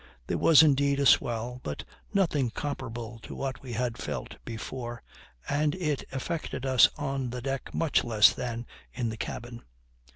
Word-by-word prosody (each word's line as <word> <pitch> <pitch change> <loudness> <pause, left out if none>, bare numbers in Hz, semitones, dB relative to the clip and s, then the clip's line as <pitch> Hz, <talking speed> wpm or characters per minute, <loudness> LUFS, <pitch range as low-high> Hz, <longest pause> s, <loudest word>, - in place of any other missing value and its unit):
There - - -1
was 160 -1 +8
indeed 140 -1 +3
a 140 - +2
swell, 120 0 +3
but 75 - -5 0.3
nothing 155 -10 +2
comparable 120 -3 -5
to - - -9
what 135 -1 -4
we 125 -3 -7
had 120 0 -2
felt - - -5
before, 120 +1 -6 0.4
and 150 +2 +1
it 150 -6 -1
affected 135 0 -3
us 130 -2 +6
on 135 -3 -2
the 125 +1 -4
deck 135 +1 -3
much 165 -3 +2
less 110 -3 +6
than 120 -1 -4 0.3
in 120 -2 -2
the 110 - -5
cabin. 120 +2 -6
130 Hz, 160 wpm, -28 LUFS, 120-140 Hz, 0.4 s, was